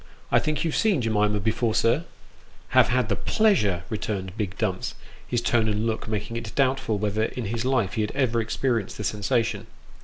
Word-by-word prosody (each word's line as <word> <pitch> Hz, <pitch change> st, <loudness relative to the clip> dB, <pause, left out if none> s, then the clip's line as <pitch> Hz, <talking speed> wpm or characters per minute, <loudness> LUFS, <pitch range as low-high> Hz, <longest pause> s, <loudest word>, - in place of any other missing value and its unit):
I -, -, +5 dB
think 155 Hz, -1 st, -1 dB
you've 165 Hz, -2 st, -1 dB
seen 210 Hz, -8 st, +3 dB
Jemima 105 Hz, -3 st, +1 dB
before, 110 Hz, +2 st, 0 dB
sir? 135 Hz, +9 st, +2 dB, 0.2 s
" -, -, -28 dB
" -, -, -27 dB
Have -, -, +5 dB
had 125 Hz, -2 st, +1 dB
the 100 Hz, -, +1 dB
pleasure," 110 Hz, -, +2 dB
returned 100 Hz, -3 st, -3 dB
big 100 Hz, -3 st, -3 dB
Dumps, 95 Hz, -4 st, -2 dB, 0.3 s
his 120 Hz, -1 st, 0 dB
tone 115 Hz, -2 st, +2 dB
and 105 Hz, +1 st, 0 dB
look 110 Hz, -1 st, -2 dB
making 110 Hz, +2 st, -3 dB
it 110 Hz, -2 st, -6 dB
doubtful 135 Hz, -5 st, +1 dB
whether 105 Hz, +1 st, 0 dB
in 125 Hz, 0 st, -4 dB
his 115 Hz, +3 st, -2 dB
life 130 Hz, -7 st, +1 dB
he 110 Hz, -, 0 dB
had 105 Hz, -, -1 dB
ever 120 Hz, -4 st, +2 dB
experienced 115 Hz, -1 st, -1 dB
the 105 Hz, -, -5 dB
sensation. 105 Hz, +3 st, 0 dB
110 Hz, 195 wpm, -25 LUFS, 105-125 Hz, 0.3 s, I